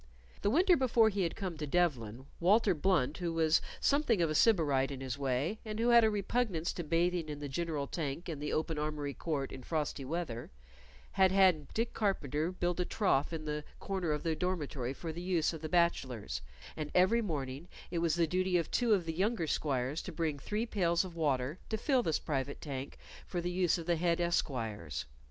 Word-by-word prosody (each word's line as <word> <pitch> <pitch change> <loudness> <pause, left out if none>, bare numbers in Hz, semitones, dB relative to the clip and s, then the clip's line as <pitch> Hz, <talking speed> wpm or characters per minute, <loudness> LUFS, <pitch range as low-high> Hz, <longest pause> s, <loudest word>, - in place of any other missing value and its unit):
The 205 - +2
winter 350 - +5
before 240 -5 +4
he 200 -2 -2
had 170 -2 -1
come 185 -5 -4
to 150 - -3
Devlen, 130 -8 0
Walter 200 +3 +4
Blunt, 155 -4 +1
who 175 -2 -1
was 160 -1 +3 0.2
somewhat 280 -7 +2
of 165 -2 +2
a - - 0
Sybarite 150 - +3
in 135 -2 -6
his 130 -2 -3
way, 140 - -1
and 215 -1 -5
who 235 +1 +2
had 235 -1 +7
a 220 - +5
repugnance 205 -4 -1
to 175 - -4
bathing 170 +1 +1
in 150 - -4
the 145 0 -5
general 150 0 -2
tank 150 +2 -4
in 160 -4 -4
the 150 0 -3
open 160 -1 -1
armory 150 -2 -2
court 145 -4 -3
in - - -8
frosty 150 -1 -2
weather, 135 -5 -4 0.6
had 190 -1 +4
had 185 -6 +4
Dick 230 +2 0
Carpenter 160 - 0
build 175 -1 -1
a - - +3
trough 175 -10 +1
in 160 -2 -5
the 150 0 -3 0.2
corner 190 -5 -2
of 150 - -1
the 165 -2 0
dormitory 150 -8 -2
for 165 +2 -5
the 170 - -6
use 175 -3 +1
of 160 - -7
the 155 - -4
bachelors, 130 - 0 0.3
and 155 -1 -4
every 190 +6 +5
morning 145 - -4 0.2
it 170 - -1
was 165 -1 +2
the 170 -1 +3
duty 185 +2 +1
of 165 -2 -2
two 235 -3 +3
of 180 -4 -2
the 165 - -2
younger 195 +1 0
squires 140 -1 -1
to - - -7
bring 155 -3 -2
three 210 - -2
pails 175 -5 +1
of 175 -2 -9
water 145 0 0
to 220 - -1
fill 260 +3 +2
this 160 -9 +1
private 140 -1 -3
tank 135 -2 -6 0.3
for 180 - -2
the 175 +1 -2
use 180 -1 +2
of 165 - -6
the 170 -1 +1
head 170 0 +1
esquires. 115 - -1
165 Hz, 210 wpm, -33 LUFS, 145-185 Hz, 0.6 s, had